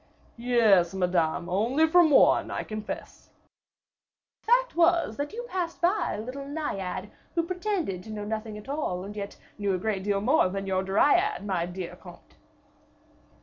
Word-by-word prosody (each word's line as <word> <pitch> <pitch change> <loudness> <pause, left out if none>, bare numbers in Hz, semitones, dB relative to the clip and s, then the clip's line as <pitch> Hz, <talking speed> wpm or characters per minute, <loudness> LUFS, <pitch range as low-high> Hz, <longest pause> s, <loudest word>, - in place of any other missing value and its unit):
"Yes, 220 -8 +3
Madame, 175 -3 0
only 235 - +2
from 345 0 +5
one, 285 - +5
I - - -3
confess." 215 -1 -7 1.1
"The 455 - -5
fact - - +3
was, 340 -8 +3
that 285 +1 -3
you 475 +2 -6
passed 365 -7 -4
by 350 +1 +1
a - - -4
little 270 +4 -7
Naiad, 200 - -4 0.2
who 335 - +2
pretended 360 - -2
to - - -10
know 210 -1 -5
nothing 215 0 -4
at 210 - -11
all, 270 -11 -2
and 205 +2 -8
yet 200 -1 -6 0.2
knew 200 -2 0
a - - -1
great 195 0 -2
deal 200 0 0
more 235 -1 +3
than 195 +1 -4
your 190 -1 0
Dryad, 290 - +2
my 180 -4 -1
dear 180 -1 -6
comte." - - -15
215 Hz, 165 wpm, -27 LUFS, 190-320 Hz, 1.1 s, from